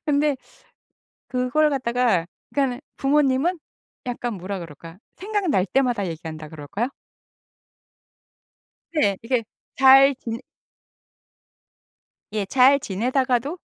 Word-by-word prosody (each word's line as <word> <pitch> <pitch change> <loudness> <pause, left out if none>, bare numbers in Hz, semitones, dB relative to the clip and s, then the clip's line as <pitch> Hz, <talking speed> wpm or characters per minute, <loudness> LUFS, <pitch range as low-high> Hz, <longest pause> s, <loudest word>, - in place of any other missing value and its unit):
근데 290 -1 +2 0.9
그걸 255 +5 +1
갖다가 240 -9 +1 0.3
그러니까는 270 -2 0 0.2
부모님은 285 +4 +2 0.5
약간 240 -2 -3
뭐라 195 +1 -5
그럴까? 165 +1 -11 0.2
생각날 375 - 0
때마다 245 -5 +1
얘기한다 160 -2 -7
그럴까요? 165 - -4 2.0
네. 205 -11 +2
이렇게 235 0 0 0.3
잘 270 +1 +7
지내 230 0 -5 1.9
예. 210 -2 -1
잘 260 +6 +5
지내다가도 255 - -1
250 Hz, 225 characters per minute, -23 LUFS, 200-275 Hz, 2.0 s, 잘